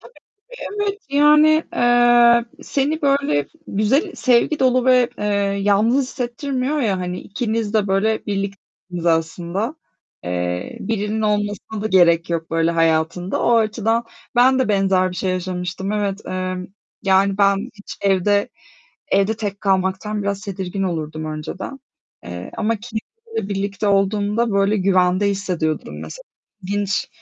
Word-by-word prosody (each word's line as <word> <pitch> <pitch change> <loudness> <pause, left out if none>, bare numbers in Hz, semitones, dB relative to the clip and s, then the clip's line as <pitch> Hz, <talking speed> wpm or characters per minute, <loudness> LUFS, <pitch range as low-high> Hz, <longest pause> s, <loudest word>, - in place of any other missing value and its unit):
Tabii - - -16 0.3
ki - - -15 0.3
evet. 405 0 -2
Yani, 300 +2 +5
eee, 240 -1 +5 0.2
seni 295 +3 -1
böyle 275 - +2 0.2
güzel, 265 - +1
sevgi 255 +5 +2
dolu 255 -1 +3
ve, 250 -2 +4
eee, - - -3 0.4
yalnız 215 +7 +3
hissettirmiyor 260 +2 -2
ya 200 -7 0
hani, 180 0 -4
ikiniz 225 -1 -3
de 210 -2 +2
böyle 210 +4 0
birliktiniz 195 -3 -5
aslında. 170 - -1 0.5
Eee, 90 0 -3
birinin 215 +1 -2
olmasına 205 0 -1
da - - 0
gerek 170 -3 +4
yok 165 -1 -2
böyle 165 0 +2
hayatında. 165 +2 0
O 235 -1 +4
açıdan 225 +1 +1 0.3
ben 260 +2 +5
de 260 - +1
benzer 190 -2 +2
bir 180 - -8
şey 190 - -1
yaşamıştım. 185 +1 -3
Evet, 205 -1 -1
eee, 185 0 -3 0.5
yani, 195 0 +3
ben 200 0 +2
hiç 205 -1 -10
evde 200 +1 +2 0.6
evde 200 +3 +2
tek 205 -3 -4
kalmaktan 190 +2 0
biraz 200 0 -2
tedirgin 190 0 -4
olurdum 155 -4 -3
önceden, 155 - -6 0.5
eee, 90 0 -7
ama 225 0 0
kedi 220 +1 -5 0.4
ile 195 - -2
birlikte 200 +1 -2
olduğumda 205 +3 +1
böyle 200 +1 +2
güvende 185 0 +2
hissediyordum 180 -6 -2
mesela. - - -9 0.4
İlginç. 200 +1 -1
200 Hz, 135 wpm, -20 LUFS, 185-235 Hz, 0.6 s, Yani